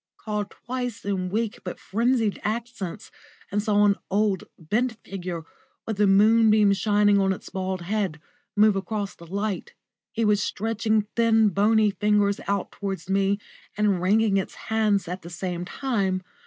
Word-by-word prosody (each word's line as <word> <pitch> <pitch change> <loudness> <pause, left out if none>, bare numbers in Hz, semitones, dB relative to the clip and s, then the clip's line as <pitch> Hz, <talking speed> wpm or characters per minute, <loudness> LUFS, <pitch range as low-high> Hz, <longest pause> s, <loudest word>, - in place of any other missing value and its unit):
called 210 -2 -3
twice 245 -4 -5
in 190 -2 -1
weak 220 +2 -2
but 180 - -6
frenzied 230 0 0
accents, 220 -3 -4 0.4
and 205 +1 +1
saw 205 -1 +3
an 200 -1 +4
old, 200 -1 +1
bent 225 +10 0
figure, 180 -4 -5 0.4
with 220 -3 -3
the 205 0 +4
moonbeams 215 0 +5
shining 205 0 +3
on 195 -1 +2
its 190 - -5
bald 185 -1 -3
head, 195 -4 -1 0.4
move 210 0 +5
across 200 +1 -3
the 170 - -14
light. 200 - -3 0.4
It 230 0 +1
was 210 -1 +3
stretching 220 +1 0
thin, 225 -2 +4
bony 210 +2 +3
fingers 205 -1 +2
out 200 -1 -1
towards 195 -1 -5
me, 195 +1 +2 0.4
and 205 -4 +2
wringing 205 +2 +3
its 190 - -3
hands 215 -4 0
at 180 +2 -5
the 170 - -9
same 175 0 -4
time. 195 -7 -1
205 Hz, 155 wpm, -25 LUFS, 195-220 Hz, 0.4 s, moonbeams